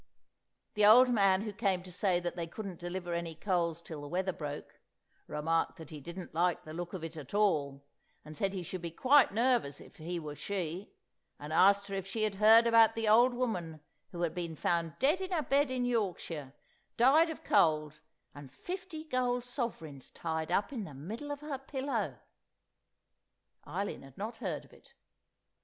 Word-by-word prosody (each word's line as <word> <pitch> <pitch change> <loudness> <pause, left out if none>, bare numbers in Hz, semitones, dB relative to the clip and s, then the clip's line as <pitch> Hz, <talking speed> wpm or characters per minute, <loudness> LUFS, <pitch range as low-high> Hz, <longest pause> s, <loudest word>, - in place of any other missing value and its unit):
The 210 - +1
old 245 +5 +8
man 195 -5 +4
who 215 -2 -5
came 195 -4 0
to 180 - -11
say 180 0 +1
that 175 0 -4
they 170 -1 -4
couldn't 190 0 -7
deliver 175 0 -4
any 170 -1 -3
coals 170 -2 -1
till 160 -3 -8
the 145 - -7
weather 185 +4 -1
broke, 150 -2 -7 0.5
remarked 165 +4 -1
that 160 -2 -11
he 150 -2 -8
didn't 170 +5 -8
like 175 +2 +1
the 155 - -9
look 175 +1 -5
of 185 -4 -5
it 165 0 -6
at 155 +3 -8
all, 145 -9 +1 0.4
and 155 0 -10
said 195 +5 -1
he 185 - -3
should 180 +1 -6
be 170 - -4
quite 265 - +4
nervous 230 - +1
if - - -15
he 170 +2 -4
were 150 -2 -6
she, 185 +2 -4 0.5
and 150 +2 -6
asked 200 +4 +5
her 200 - -7
if 195 -1 -3
she 215 +2 -2
had 215 -2 +1
heard 225 +2 +8
about 230 -1 +6
the 225 -1 -1
old 240 +4 +5
woman 180 -11 -2 0.3
who 175 -1 -4
had 170 - 0
been 170 -2 -4
found 165 0 -1
dead 300 +9 +2
in 375 - -3
her 340 -5 0
bed 285 0 +2
in 255 -1 -1
Yorkshire, 180 - -2 0.4
died 290 +8 +5
of 320 - -7
cold, 155 -1 +2 0.3
and 145 -2 -11
fifty 360 - -6
golden 250 -4 0
sovereigns 230 - -5
tied 160 0 -4
up 200 +8 +1
in 230 -5 -3
the 155 -7 -9
middle 220 - -7
of 290 0 -5
her 295 -3 -4
pillow? 260 - -3 1.5
Eileen 190 +7 -3
had 135 -1 -15
not 220 +3 -5
heard - - -4
of - - -21
it. - - -21
185 Hz, 190 wpm, -32 LUFS, 165-230 Hz, 1.5 s, old